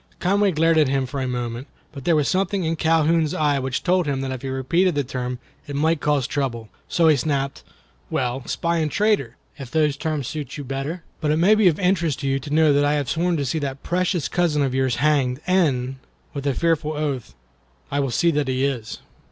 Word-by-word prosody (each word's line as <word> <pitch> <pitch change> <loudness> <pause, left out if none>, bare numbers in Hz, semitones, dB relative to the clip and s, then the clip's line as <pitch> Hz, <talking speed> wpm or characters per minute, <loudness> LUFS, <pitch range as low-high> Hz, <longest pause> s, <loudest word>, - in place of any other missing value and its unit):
Conway 200 +2 +2
glared 165 0 +3
at 150 - +4
him 135 0 0
for 135 +2 -4
a 130 - -1
moment, 120 +1 -4 0.2
but 140 -3 -10
there 170 - +4
was 150 -2 +2
something 195 0 0
in 165 0 0
Calhoun's 160 -1 +2
eye 145 -2 +2
which 130 0 -3
told 180 -2 +2
him 135 -2 -1
that 135 -1 -3
if 130 -2 -5
he 135 - -4
repeated 165 +7 +1
the 145 - +1
term 125 -1 -4 0.3
it 145 - -5
might 160 +2 +1
cause 145 -4 +1
trouble, 120 -6 -3 0.2
so 165 -2 +3
he 155 - +6
snapped: 140 0 -2 0.5
"Well, 125 0 -1
spy 170 0 -1
and 155 -2 0
traitor, 205 - +1 0.2
if 135 -3 -7
those 150 -1 +1
terms 150 -3 -3
suit 150 -4 -5
you 145 - -5
better; 135 +6 -4 0.2
but 155 - -1
it 155 - +2
may 185 +6 +5
be 215 -3 +4
of 165 -1 +2
interest 170 -6 +1
to 140 - -2
you 135 0 +1
to 140 - -9
know 155 -1 +4
that 145 +1 +3
I 145 0 +2
have 145 -3 -1
sworn 170 +1 +1
to 140 - -1
see 145 +5 -1
that 140 -2 -5
precious 180 -2 0
cousin 160 -5 +1
of 135 -2 -1
yours 130 -2 +1
hanged, 140 -4 +1
and"—with 140 -4 -1
a 135 - +1
fearful 165 -2 +1
oath—"I 65 - -6
will 135 -1 0
see 170 +8 +2
that 145 -3 0
he 130 +1 +1
is." 120 -5 -3
145 Hz, 220 wpm, -22 LUFS, 130-165 Hz, 0.5 s, he